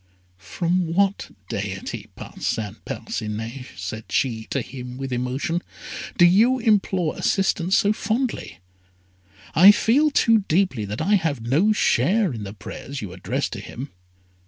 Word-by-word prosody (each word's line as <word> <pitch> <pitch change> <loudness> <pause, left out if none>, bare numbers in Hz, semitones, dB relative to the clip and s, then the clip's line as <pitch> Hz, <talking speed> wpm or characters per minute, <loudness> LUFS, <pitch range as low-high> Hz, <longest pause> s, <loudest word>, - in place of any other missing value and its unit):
"From 170 - -1
what 200 +1 +1 0.2
deity, 100 -1 -5
Parcin 105 -3 -4
Parcinet," 110 +4 -5
said 95 +4 -6
she 115 -4 0
to 135 - -1
him 125 0 -8
with 135 -1 -4
emotion, 130 +7 -1 0.6
"do 175 - +7
you 220 +9 +5
implore 200 -8 +1
assistance 190 -2 +1
so 205 +1 +3
fondly? 225 - -2 1.0
I 190 +5 +9
feel 270 +9 +3
too 230 -5 +4
deeply 155 - +1
that 105 +5 -4
I 200 +5 +2
have 155 -8 -2
no 150 - +3
share 190 - +2
in 110 -3 -6
the 100 - -7
prayers 135 +6 -7
you 95 -3 -6
address 90 - -2
to - - -6
him." 135 +4 -8
155 Hz, 135 wpm, -23 LUFS, -, 1.0 s, I